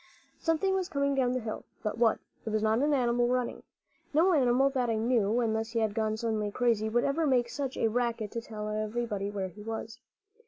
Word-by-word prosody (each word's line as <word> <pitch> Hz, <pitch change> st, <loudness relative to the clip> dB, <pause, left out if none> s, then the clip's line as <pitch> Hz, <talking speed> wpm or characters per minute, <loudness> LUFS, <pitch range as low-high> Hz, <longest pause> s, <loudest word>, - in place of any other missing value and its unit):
Something 325 Hz, +4 st, +1 dB
was 380 Hz, -1 st, -1 dB
coming 280 Hz, -3 st, +1 dB
down 255 Hz, -2 st, +2 dB
the 255 Hz, -, 0 dB
hill; 220 Hz, -2 st, -5 dB, 0.2 s
but 210 Hz, -, -1 dB
what? 230 Hz, -1 st, +3 dB, 0.3 s
It -, -, -4 dB
was 215 Hz, 0 st, 0 dB
not 220 Hz, +1 st, +3 dB
an 295 Hz, +3 st, +2 dB
animal 240 Hz, -3 st, +2 dB
running. 250 Hz, 0 st, -1 dB, 0.5 s
No 350 Hz, +4 st, +5 dB
animal 265 Hz, -1 st, +4 dB
that 255 Hz, -3 st, 0 dB
I 225 Hz, -, +1 dB
knew, 225 Hz, -1 st, +2 dB
unless 225 Hz, 0 st, -1 dB
he 230 Hz, -, +1 dB
had 220 Hz, -2 st, +1 dB
gone 215 Hz, 0 st, 0 dB
suddenly 220 Hz, -2 st, -1 dB
crazy, 220 Hz, -1 st, +1 dB
would 240 Hz, +2 st, +2 dB
ever 305 Hz, +3 st, +1 dB
make 245 Hz, -3 st, +2 dB
such 270 Hz, 0 st, -4 dB
a -, -, +2 dB
racket 230 Hz, -2 st, -1 dB
to 230 Hz, -, -3 dB
tell 215 Hz, -2 st, -6 dB
everybody 215 Hz, -1 st, -2 dB
where 195 Hz, -2 st, -3 dB
he 210 Hz, +4 st, -13 dB
was. 225 Hz, +2 st, -6 dB
235 Hz, 210 wpm, -30 LUFS, 220-255 Hz, 0.5 s, No